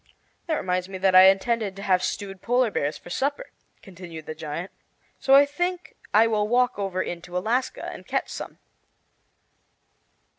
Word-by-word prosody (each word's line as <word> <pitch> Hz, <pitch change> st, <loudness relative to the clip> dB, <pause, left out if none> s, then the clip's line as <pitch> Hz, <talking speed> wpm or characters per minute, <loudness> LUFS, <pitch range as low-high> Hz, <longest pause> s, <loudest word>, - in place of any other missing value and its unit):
"That 320 Hz, -, +1 dB
reminds 185 Hz, -5 st, -2 dB
me 190 Hz, -, -6 dB
that 190 Hz, 0 st, +2 dB
I 185 Hz, 0 st, +9 dB
intended 200 Hz, +1 st, 0 dB
to 195 Hz, -, -8 dB
have 185 Hz, -2 st, +2 dB
stewed 195 Hz, -1 st, -4 dB
polar 245 Hz, 0 st, +2 dB
bears 145 Hz, -4 st, -1 dB
for 175 Hz, -, -13 dB
supper," 285 Hz, -, -2 dB, 0.3 s
continued 170 Hz, -4 st, -10 dB
the 155 Hz, -, -5 dB
giant; 160 Hz, +3 st, -6 dB, 0.5 s
"so 270 Hz, -, +5 dB
I 280 Hz, +1 st, +8 dB
think 355 Hz, +5 st, -3 dB, 0.2 s
I 220 Hz, +2 st, +6 dB
will 215 Hz, -2 st, +1 dB
walk 245 Hz, -1 st, +2 dB
over 190 Hz, -2 st, -1 dB
into 175 Hz, +1 st, -6 dB
Alaska 235 Hz, +7 st, -1 dB
and -, -, -8 dB
catch -, -, -1 dB
some." -, -, -7 dB
195 Hz, 160 wpm, -25 LUFS, 180-245 Hz, 0.5 s, I